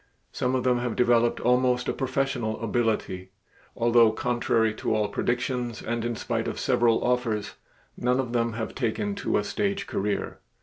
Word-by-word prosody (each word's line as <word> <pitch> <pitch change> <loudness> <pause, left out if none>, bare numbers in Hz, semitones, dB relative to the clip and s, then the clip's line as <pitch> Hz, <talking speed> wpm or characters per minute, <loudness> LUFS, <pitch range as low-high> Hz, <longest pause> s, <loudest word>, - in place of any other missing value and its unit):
Some 125 +1 -1
of 130 - 0
them 125 -1 +2
have 120 -2 -2
developed 120 -1 +3
almost 125 0 +2
a - - 0
professional 130 -4 -1
ability, 110 -5 -1 0.5
although 115 -1 +5
contrary 115 -1 +1
to 110 - -1
all 105 -1 +1
predictions 120 +1 -1
and 115 0 -2
in 120 0 -2
spite - - -2
of - - -4
several 115 -1 +2
offers, 115 -4 0 0.4
none 125 +1 +1
of 125 -3 -2
them 115 -1 +1
have 110 0 -4
taken 110 -5 -1
to - - 0
a 105 - 0
stage 200 - -1
career. 105 +1 -2
120 Hz, 165 wpm, -26 LUFS, 110-125 Hz, 0.5 s, although